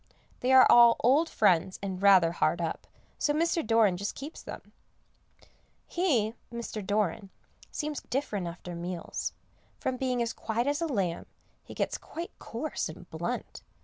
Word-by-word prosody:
They 255 - +1
are 260 0 +9
all 235 -1 +8
old 285 +8 +4
friends, 185 -3 +2
and 190 -1 -4
rather 190 -4 +6
hard 170 0 +1
up, 165 -1 -3 0.3
so 295 - +2
Mr. 330 +1 +1
Doran 220 -5 +3
just 200 +2 -4
keeps 290 +4 -8
them. - - -10 1.1
He 255 - +1 0.2
Mr. 235 -3 -5
Doran 200 -1 -1 0.4
seems 300 -2 -4
different 215 -9 -2
after 175 +1 -7
meals; 175 0 -4 0.5
from 260 -1 -2
being 255 -1 -1
as 230 - -3
quiet 230 +2 -2
as 290 +3 0
a 335 - 0
lamb, 195 - -2 0.4
he - - -11
gets - - -1
quite 335 +2 -7
coarse - - -4
and - - -11
blunt. - - -4
225 Hz, 150 wpm, -29 LUFS, 185-270 Hz, 1.1 s, are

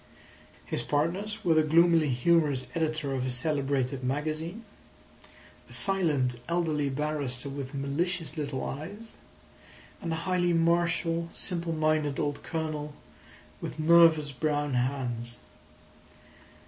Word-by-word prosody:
His - - -2
partners 195 +9 -1
were 170 - +5
the 155 - +5
gloomily 165 0 +4
humorous 140 +1 +2
editor 155 -3 -1
of 130 -1 -1
a 130 - -1
celebrated 135 -1 0
magazine; 155 - -3 1.0
a - - -8
silent, 150 - +2
elderly 160 -4 0
barrister 140 -2 -2
with 135 0 -6
malicious 160 +4 -2
little 145 -4 -3
eyes; 205 +11 -7 0.9
and 170 - -3
a - - 0
highly 180 -2 +2
martial, 170 0 +1
simple 170 -2 -2
minded 155 -3 +1
old 145 -1 -1
Colonel 155 -3 -4 0.7
with - - -5
nervous 160 -2 +5
brown 145 +1 -1
hands. 125 -2 -2
155 Hz, 110 wpm, -29 LUFS, 140-170 Hz, 1.0 s, were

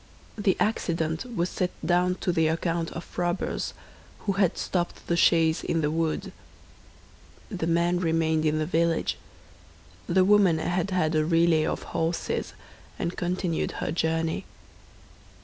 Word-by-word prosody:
The 200 -3 +1
accident 165 -5 0
was 170 -2 +1
set 180 - -1 0.2
down 180 +2 +2
to 180 - +1
the 160 -2 +2
account 165 +1 -1
of 170 - -8
robbers, 175 0 -1 0.5
who 200 - -1
had 190 -3 +1
stopped 175 -2 -2
the 170 - 0
chaise 165 -2 +3
in 165 - 0
the 150 0 0
wood. 160 0 -1 1.2
The 175 -5 -2
man 170 +1 +2
remained 160 -2 +1
in 155 0 +2
the 155 - 0
village; 165 0 0 0.9
the 185 +1 +4
woman 200 -4 +5
had 175 +4 -1
had 165 -4 +1
a 155 -1 +3
relay 165 -1 +3
of - - -3
horses, 165 +1 -2 0.4
and 170 - -3
continued 180 -1 -1
her - - -3
journey. 160 0 -1
170 Hz, 140 wpm, -26 LUFS, 160-180 Hz, 1.2 s, woman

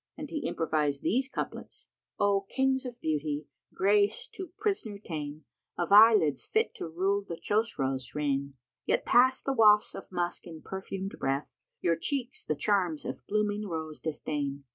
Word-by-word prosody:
And 300 -1 -7
he 310 - -2
improvised 150 -3 0
these 260 +5 +1
couplets, - - -6 0.3
"O 200 -1 +2
Kings 265 -1 +1
of 240 -1 -9
beauty, 150 -1 -1 0.3
grace 205 +2 +2
to 375 -4 -7
prisoner 315 - -1
ta'en 155 -6 -6 0.2
* - - -52
Of 175 +2 -2
eyelids 205 - +7
fit 445 +1 +1
to - - -4
rule 195 +5 0
the 175 -4 -6
Chosroës' 135 - -1
reign: 140 -2 -1 0.3
Ye - - +4
pass 260 +2 +4
the 275 - 0
wafts 210 -3 +5
of - - -9
musk 175 -1 -2
in 160 -2 -10
perfumed 190 0 -5
breath; 135 +2 -1 0.2
* - - -57
Your 170 -2 +2
cheeks 260 - -2
the 155 - -1
charms 180 -3 +1
of - - -5
blooming 210 0 0
rose 160 -3 -5
disdain. 145 -3 -3
190 Hz, 165 wpm, -29 LUFS, 150-215 Hz, 0.3 s, eyelids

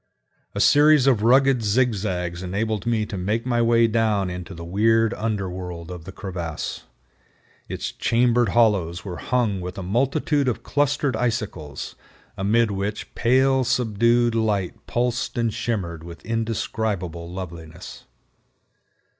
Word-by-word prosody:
A - - -2
series 150 -2 +6
of 125 -6 +3
rugged 130 +2 +4
zigzags 100 -6 0
enabled 105 +3 -2
me 115 -2 +1
to 100 -3 -5
make 105 +6 -1
my 120 -2 +1
way 115 0 +4
down 110 -4 +1
into 90 +1 -7
the 85 0 -8
weird 115 +5 +2
under 105 -3 -2
world 90 -2 -7
of 90 -2 -8
the 95 - -7
crevasse. 90 -5 -5 0.8
Its - - -4
chambered 120 0 +2
hollows 95 -7 +2
were 90 -3 -5
hung 115 -7 0
with 90 0 -6
a 95 - -4
multitude 135 - +1
of 125 - -1
clustered 145 -1 +1
icicles, 110 - -3 0.4
amid 105 +3 +2
which 100 +2 -4
pale, 130 +2 +3
subdued 120 0 +2
light 105 -5 -1
pulsed 120 0 -1
and 115 -2 0
shimmered 85 -8 -3
with 85 0 -11
indescribable 105 -6 -2
loveliness. 85 -3 -8
110 Hz, 130 wpm, -23 LUFS, 90-120 Hz, 0.8 s, series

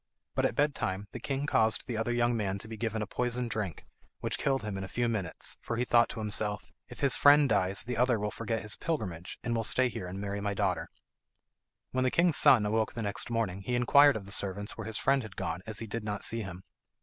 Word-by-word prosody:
But - - +2
at - - -6
bed 145 0 +2
time 95 -3 -3
the 125 - -7
king 135 +3 -2
caused 110 -6 +2
the 125 - -4
other 115 +2 -1
young 120 0 +1
man 100 -3 -1
to 105 - -9
be 110 - -7
given 110 -1 -2
a - - -3
poisoned 120 +2 -2
drink, 100 -5 -4 0.3
which - - -3
killed 135 -5 0
him 105 -2 -4
in 95 - -4
a - - -5
few 120 +5 -1
minutes, 105 -7 -3
for 115 - -4
he 125 - 0
thought 120 -1 +4
to - - -6
himself, 105 -1 -2 0.2
"If - - -11
his 140 -2 +4
friend 145 0 +6
dies 100 -3 +1
the 125 -1 -4
other 125 -1 +3
will 105 0 -2
forget 115 0 -3
his 105 - -2
pilgrimage, 95 - -4
and 120 - -1
will 115 - 0
stay 130 +3 +2
here 95 -5 -6
and 95 +2 -6
marry 100 0 -4
my 100 0 -2
daughter." - - -1 1.0
When 130 0 0
the 130 - +3
king's 170 +2 +3
son 115 -5 +7
awoke 110 +1 0
the 115 - -4
next 105 +3 -2
morning 110 -5 -1
he 120 +6 -2
inquired 140 +4 +6
of 105 -3 -5
the 100 - -11
servants 100 +1 0
where - - -7
his 110 -1 -4
friend 135 +2 +2
had 110 -5 -10
gone, 80 +2 -3
as 110 -1 -2
he 115 - -3
did 115 +1 -5
not 105 -1 -3
see 115 0 0
him. 95 -2 -8
110 Hz, 250 wpm, -30 LUFS, 100-120 Hz, 1.0 s, son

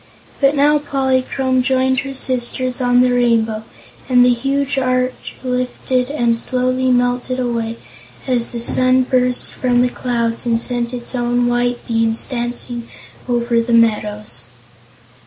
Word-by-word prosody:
But 275 +1 +3
now 295 +1 +4
Polychrome 265 -2 0
joined 260 0 +1
her 275 0 -5
sisters 255 0 -1
on 245 0 +4
the 250 0 +3
Rainbow 225 -3 +1 0.5
and 250 -1 +5
the 250 - +4
huge 275 +2 -1
arch 255 0 -1
lifted 250 0 -1
and 240 -5 +1
slowly 255 +2 0
melted 245 +1 0
away 230 -2 -2 0.5
as 245 -3 0
the 235 - -4
sun 255 +2 +3
burst 250 -1 0
from 245 -1 +1
the 250 - +1
clouds 235 -2 -2
and 230 -1 +2
sent 240 0 -2
its 245 0 -4
own 245 0 0
white 240 0 0
beams 225 -1 +1
dancing 240 -1 -3 0.4
over 235 -1 +1
the 235 +1 -2
meadows. 210 - +1
245 Hz, 140 wpm, -18 LUFS, 235-255 Hz, 0.5 s, and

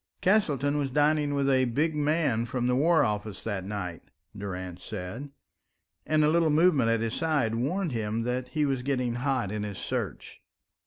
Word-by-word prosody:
"Castleton 150 -8 +2
was 140 -2 -1
dining 145 +1 +2
with 140 -1 +1
a 130 -1 +3
big 150 +7 0
man 145 -6 +1
from 125 0 -2
the 125 0 +2
War 160 +4 +4
Office 105 -4 -3
that 100 -4 -3
night," 90 -4 -5 0.3
Durrance 90 -2 -6
said, 110 +8 -6 0.8
and 155 0 +3
a 150 - +4
little 165 0 +3
movement 150 -6 +4
at 115 -1 +1
his 115 0 -2
side 150 -9 0
warned 160 +9 -1
him 110 -1 -2
that 125 +1 -2
he 150 +2 0
was 135 -3 0
getting 125 -2 -1
hot 125 -4 -1
in 105 0 -3
his 105 -2 -5
search. - - -5
130 Hz, 175 wpm, -28 LUFS, 110-150 Hz, 0.8 s, War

